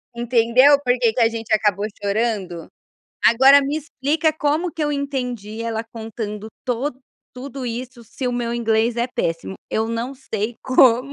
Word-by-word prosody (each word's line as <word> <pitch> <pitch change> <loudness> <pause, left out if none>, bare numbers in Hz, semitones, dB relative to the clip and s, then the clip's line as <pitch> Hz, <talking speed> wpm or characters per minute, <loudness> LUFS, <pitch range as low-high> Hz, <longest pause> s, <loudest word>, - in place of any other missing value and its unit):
Entendeu 240 +4 +4
por 250 -1 +2
que 230 -3 +2
que 245 - 0
a 225 - +5
gente 225 -1 -4
acabou 210 -1 +2 0.2
chorando? 200 -5 -2 0.6
Agora 265 +4 +7
me 285 +3 -2
explica 310 +1 0
como 310 +3 -1
que 325 - -4
eu 295 - 0
entendi 250 -6 -4
ela 225 -1 -3
contando 220 -2 -6 0.2
to 250 +3 -1 0.4
tudo 260 0 -7
isso 240 +1 -6
se 250 +4 -6
o 245 - 0
meu 240 -1 -2
inglês 225 0 +1
é 235 +1 +1
péssimo? 165 -5 -3 0.2
Eu 220 0 0
não 230 +4 -3
sei 235 -4 -4
como, 255 +1 +4
240 Hz, 160 wpm, -21 LUFS, 225-270 Hz, 0.6 s, Agora